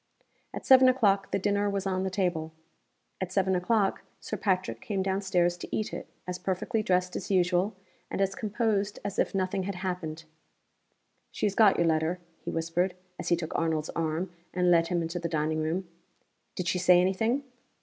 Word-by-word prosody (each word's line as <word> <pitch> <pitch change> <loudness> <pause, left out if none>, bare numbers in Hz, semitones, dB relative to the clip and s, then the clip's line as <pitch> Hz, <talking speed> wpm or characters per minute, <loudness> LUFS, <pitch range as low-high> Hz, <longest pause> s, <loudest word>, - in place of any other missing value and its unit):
At - - -7
seven 260 -1 +8
o'clock 205 -6 +2
the - - 0
dinner 205 +1 +1
was 200 -1 -2
on 185 -1 0
the 190 - -1
table. 175 -4 -1 0.7
At 185 -1 -3
seven 190 -1 +2
o'clock 195 +2 +1 0.2
Sir - - -5
Patrick 185 - -1
came 195 -2 -2
down 190 +1 0
stairs 175 -3 +1
to - - -7
eat 215 - -2
it, - - -6 0.2
as 180 0 -4
perfectly 195 +5 -1
dressed 180 -2 +1
as - - -4
usual, 185 +2 +2 0.3
and - - -4
as 195 0 +1
composed 210 -2 -1
as 200 -1 -3
if - - +1
nothing 190 0 0
had 195 +1 -3
happened. 180 -3 -4 1.1
"She - - -2
has 205 - +1
got 210 -2 +5
your 170 - +3
letter," 160 +2 +1 0.3
he - - -4
whispered, 165 +3 -1 0.2
as - - -3
he 170 - +5
took 165 -1 -5
Arnold's 160 -2 0
arm, 165 +2 -2 0.2
and 180 -1 +3
led 165 -1 +4
him 175 -1 0
into 165 +2 -3
the 170 0 -3
dining 155 0 0
room. 170 +4 -2 0.7
"Did 180 - -3
she 185 0 +1
say 180 0 +6
any 185 +2 +3
thing?" 235 +8 0
185 Hz, 190 wpm, -28 LUFS, 170-200 Hz, 1.1 s, seven